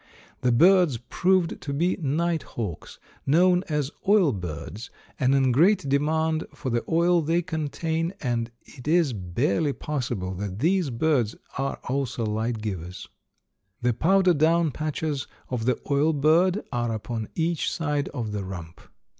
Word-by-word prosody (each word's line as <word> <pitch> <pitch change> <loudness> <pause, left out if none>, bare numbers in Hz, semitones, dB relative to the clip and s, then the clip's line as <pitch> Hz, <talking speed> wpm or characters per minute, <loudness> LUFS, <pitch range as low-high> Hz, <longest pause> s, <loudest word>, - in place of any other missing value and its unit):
The 125 - +2
birds 175 +1 +5
proved 180 +8 0
to 140 - -4
be 170 +6 +1
night 160 +3 0
hawks, 100 -9 -6 0.3
known 180 +5 +4
as 150 -2 -1 0.2
oil 195 -7 +5
birds, 90 +5 -6 0.3
and 130 +1 +3
in 135 -2 +3
great 165 - +4
demand 155 +3 +1
for 135 -4 -4
the 120 0 0
oil 170 +1 +3
they 165 +3 +1
contain, 160 0 -2
and 120 -3 -1
it 125 +1 -13
is 160 -4 +3
barely 100 - 0
possible 120 -12 -3
that 95 0 -5
these 170 - +2
birds 125 -3 +1 0.2
are 135 +1 -2
also 130 -3 -1
light 110 +1 -2
givers. 90 -4 -5 0.8
The 120 0 +3
powder 185 +8 +3
down 160 +1 +3
patches 155 -1 -3 0.2
of 120 -3 -2
the 125 -1 +1
oil 145 +3 +3
bird 170 +7 +3
are 120 -2 -1
upon 110 0 -4
each 165 -1 0
side 150 -3 -1
of 115 -6 -4
the 105 -1 -3
rump. 85 -3 -8
140 Hz, 145 wpm, -25 LUFS, 115-165 Hz, 0.8 s, birds